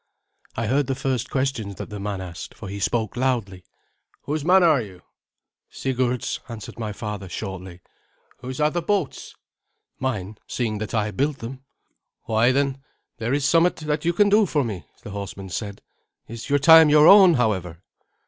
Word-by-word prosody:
I 115 - -1
heard 135 +4 +1
the 135 - -1
first 130 -3 -2
questions 130 -7 -2
that - - -8
the 105 - -6
man 100 -1 -4
asked, 90 -2 -8
for - - -9
he 100 +1 -6
spoke 110 +1 -1
loudly. 120 -8 -1 0.6
"Whose 150 +1 -3
man 180 +3 +5
are 155 -6 +4
you?" 95 -5 -11 0.7
"Sigurd's," 125 -2 -2
answered 115 0 -9
my 110 -2 -3
father 105 -2 -6
shortly. 95 -3 -7 0.6
"Whose 130 +2 -7
are 150 0 +2
the 175 - -1
boats?" 185 -3 -2 0.6
"Mine, 110 -6 -3
seeing 110 -4 -2
that 110 +1 -4
I 105 -1 0
built 140 +4 -1
them." 130 +3 -8 0.6
"Why, 115 +3 +2
then, 135 0 0 0.4
there 115 +1 -2
is 140 0 +1
somewhat 165 +3 +4
that 150 -1 -3
you 170 - +2
can 205 +3 +4
do 210 0 +4
for 150 -3 +1
me," 95 - -6 0.2
the 105 - -8
horseman 100 -1 -7
said. 100 +3 -6 0.4
"Is 115 +3 -8
your 145 - +4
time 160 +2 +8
your 150 0 +6
own, 190 -4 +8
however?" 95 -8 -1
120 Hz, 170 wpm, -23 LUFS, 105-145 Hz, 0.7 s, time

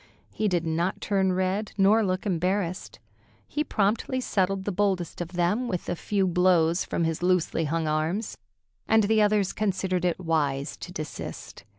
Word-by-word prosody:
He 215 - -1
did 175 -4 0
not 170 +3 -1
turn 190 -2 +1
red 190 +3 -1
nor 210 +3 +5
look 185 0 -1
embarrassed. 185 0 -1 0.5
He 300 - -1
promptly 230 +1 0
settled 195 -5 0
the 205 - -1
boldest 185 -3 -1
of 175 +1 -6
them 180 +8 +1
with 180 -6 -3
a 175 - -1
few 195 +2 0
blows 175 -1 +3
from - - -2
his 165 0 -1
loosely 180 -2 +1
hung 160 +1 -1
arms, 160 +8 -1 0.5
and 220 0 +4
the 215 +1 +3
others 205 -2 +2
considered 190 -3 -1
it 175 -1 0
wise 145 -5 -1
to 180 - -8
desist. 155 - -7
185 Hz, 165 wpm, -26 LUFS, 170-205 Hz, 0.5 s, nor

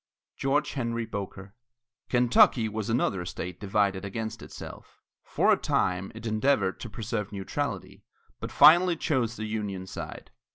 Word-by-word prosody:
GEORGE 145 +2 +1
HENRY 115 -3 -2
BOKER. 100 -2 -7 0.6
Kentucky 120 -1 +4
was 110 0 -4
another 110 -6 0
state 90 0 -6
divided 100 -1 0
against 110 +3 -5
itself. - - -11 0.2
For - - +2
a - - +6
time, 90 +1 -1
it 115 - -9
endeavored 110 -3 +1
to 120 - -7
preserve 105 -1 -4
neutrality, 95 -2 -4 0.4
but - - -6
finally 175 +2 +7
chose 130 -8 0
the 110 - -5
Union 105 -4 -4
side. - - -8
110 Hz, 135 wpm, -27 LUFS, 100-120 Hz, 0.6 s, finally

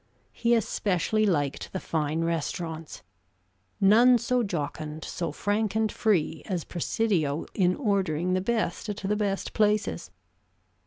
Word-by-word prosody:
He 235 0 +2
especially 215 -1 +1
liked 145 -7 -1
the 190 - -2
fine 160 0 -1
restaurants. 165 0 -3 0.8
None 235 +6 +6
so 245 +1 +1
jocund, 155 -5 -4
so 170 -3 -3
frank 205 +6 -1
and 220 -1 +1
free 165 -7 +1
as 180 -5 -2
Presidio 170 -5 -1
in 180 -2 +2
ordering 185 - 0
the 185 - +1
best 215 -1 -1
at 205 - -3
the 200 +2 -1
best 200 -2 -2
places. 210 - +1
190 Hz, 125 wpm, -27 LUFS, 160-215 Hz, 0.8 s, None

